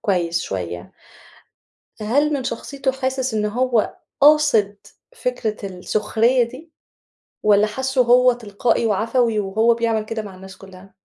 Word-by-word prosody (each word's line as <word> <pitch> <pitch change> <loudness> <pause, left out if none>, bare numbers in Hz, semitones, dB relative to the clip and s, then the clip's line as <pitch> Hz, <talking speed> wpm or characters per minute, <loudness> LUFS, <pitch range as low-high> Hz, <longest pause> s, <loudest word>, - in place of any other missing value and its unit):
كويس 170 -4 0
شوية، 90 -2 -6 1.1
هل 285 +8 +1
من 275 -3 -2
شخصيته 265 +3 -3
حاسِس 260 -1 -2
إن 210 -1 0
هو 240 +1 0 0.3
قاصد 285 -9 +4 0.4
فكرة 220 - -3
السُخرية 220 +6 +1
دي؟ 260 +8 -10 0.7
والّا 210 0 +4
حاسُّه 265 +3 0
هو 250 +1 +5
تلقائي 230 0 -1
وعفوي، 225 +2 +1
وهو 220 +4 +2
بيعمل 225 -2 -1
كده 225 0 -4
مع 200 -3 -10
الناس 190 +1 -12
كُلّها؟ 190 0 -15
225 Hz, 125 wpm, -21 LUFS, 205-255 Hz, 1.1 s, هو